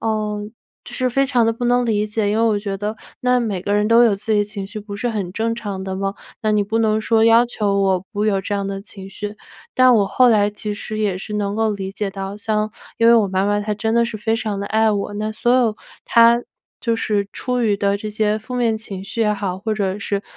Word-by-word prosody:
呃， 215 -2 -1 0.4
就 - - -10
是 255 0 +1
非 275 +2 +2
常 250 -4 +2
地 225 - +2
不 245 +2 -5
能 245 0 +3
理 215 -2 +1
解， 210 -1 -1
因 215 - 0
为 225 - +3
我 215 -2 +2
觉 200 -1 -4
得 210 +2 -4 0.2
那 250 0 +3
每 205 -6 -2
个 205 +2 -1
人 210 +1 +2
都 230 +1 +6
有 215 -4 +4
自 215 +2 -7
己 210 - +3
的 205 - +2
情 205 -1 -6
绪 215 +2 -7
不 205 -1 -8
是 240 +3 -2
很 200 -5 -3
正 225 +2 -1
常 205 -4 -5
的 190 -1 -4
吗？ 195 +1 -2 0.3
那 215 0 +1
你 210 -1 +3
不 220 +3 -1
能 220 -1 +2
说 225 0 +3
要 230 +1 +6
求 205 -4 -1
我 190 -1 +1
不 205 0 -1
有 200 -3 +2
这 205 +2 -3
样 200 -1 -1
的 195 0 -4
情 195 -1 -10
绪， 210 +1 -6 0.4
但 255 -1 +6
我 205 -3 +3
后 250 +5 +4
来 205 -2 +4
其 210 0 -5
实 215 +1 -5
也 200 -4 0
是 210 +2 -6
能 205 -1 -1
够 220 -1 +1
理 195 -1 -5
解 200 0 -3
到 195 +1 -6
像 215 0 -1 0.3
因 230 - +4
为 - - +8
我 220 -3 +4
妈 190 +1 0
妈 205 0 +1
她 210 0 -2
真 220 +2 -1
的 235 - +4
是 230 -2 -4
非 225 +2 0
常 210 -3 -3
地 200 - -3
爱 220 +1 +2
我， 205 0 -2
那 215 +1 -3
所 240 +3 +1
有 235 -4 +3 0.3
她 235 0 +5 0.4
就 230 -2 0
是 210 -3 0
出 250 0 -2
于 210 -3 +2
的 200 0 +1
这 215 +1 -6
些 210 0 0
负 235 +4 -8
面 230 -3 +1
情 195 -3 -7
绪 230 +3 -5
也 210 -1 +2
好， 190 -2 -3
或 215 +2 -2
者 200 -1 -1
是 200 0 -2
210 Hz, 285 characters per minute, -20 LUFS, 200-225 Hz, 0.4 s, 为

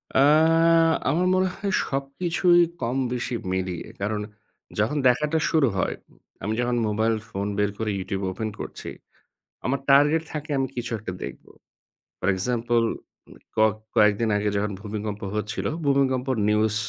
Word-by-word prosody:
অ্যা 135 - +6 0.8
আমার 175 +6 +2
মনে 185 0 +3
হয় 200 -1 -3
সবকিছুই 170 +6 +2 0.2
কম 120 +3 -1 0.2
বেশি 125 0 -2 0.2
মিলিয়ে। 95 -2 -3
কারণ 105 +1 -1 0.6
যখন 115 +8 +1
দেখাটা 150 +6 +2
শুরু 155 -5 +3
হয়, - - 0 0.5
আমি 105 - -1
যখন 120 0 0
মোবাইল 110 +2 +1
ফোন 100 -1 -3
বের 105 0 +1
করে 110 -1 -1
YouTube 95 +1 -3
open 110 +4 -3
করছি - - -7 0.8
আমার 135 +3 0
target 150 +4 +5
থাকে 150 0 -5
আমি 135 - +1
কিছু 120 0 -3
একটা 95 -3 -6
দেখব। - - -8 0.7
For - - -2
example 120 +3 +1 0.7
ক - - +1 0.4
কয়েকদিন 105 0 +4
আগে 105 0 0
যখন 105 +1 -1
ভূমিকম্প 105 0 -5
হচ্ছিল 105 0 -3 0.2
ভূমিকম্প 135 -2 +2 0.2
news 105 0 +2
115 Hz, 140 wpm, -25 LUFS, 105-140 Hz, 0.8 s, অ্যা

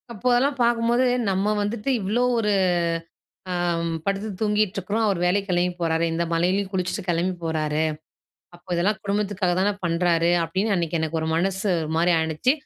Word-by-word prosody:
அப்போ 235 +2 -4
அதெல்லாம் 270 +3 +1
பார்க்கும்போது, 235 +1 +2 0.2
"நம்ம 195 +2 +1
வந்துட்டு 210 +4 -2
இவ்வளோ 215 +6 0 0.2
ஒரு 210 -2 +1 1.0
அ - - -2 0.2
அம் 165 0 -2
படுத்து 200 +2 -1
தூங்கிட்டுருக்கிறோம், 210 0 0
அவர் 200 -4 +1
வேலைக்கு 195 +3 +1
கெளம்பி 180 0 +1
போறாரு. 165 0 +1
இந்த 170 +1 0
மழையிலயும் 185 +4 +1
குளிச்சுட்டு 185 -1 -2
கெளம்பி 175 +2 +1
போறாரு. 155 -1 -1 0.7
அப்போ 175 +1 -19
இதெல்லாம் 190 +5 +1
குடும்பத்துக்காக 200 -2 0
தான 200 +2 +3
பண்றாரு." 170 0 +2
அப்படின்னு 190 +6 -1
அன்னைக்கு 170 -2 -1
எனக்கு 160 0 -1
ஒரு 160 - -2
மனசு 190 +4 0
ஒரு 155 - -4
மாரி 170 +2 +3
ஆனுச்சு. 160 - +1
185 Hz, 155 wpm, -24 LUFS, 170-210 Hz, 1.0 s, தான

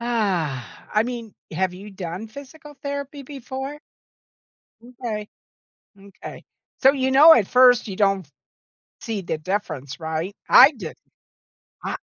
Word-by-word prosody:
I 200 - -1
mean, 235 -3 -6 0.2
have 185 +2 0
you 200 +3 -10
done 185 +2 -6
physical 290 +5 -12
therapy 280 0 -5
before? 270 +1 -7 1.0
M'kay. 235 -3 -6 0.7
M'kay. 195 -1 -11 0.4
So, 270 0 +7
you 265 -2 -1
know, 300 +5 +9
at 215 -10 +2
first, 250 -2 +5
you 195 - -5
don't 195 -4 +1 0.7
see 220 -3 -3
the 170 -3 -3
difference, 155 -6 -4
right? 160 +5 -4
I 270 +4 +9
didn't. 205 - -9 0.9
I - - -2
220 Hz, 120 wpm, -23 LUFS, 185-265 Hz, 1.0 s, know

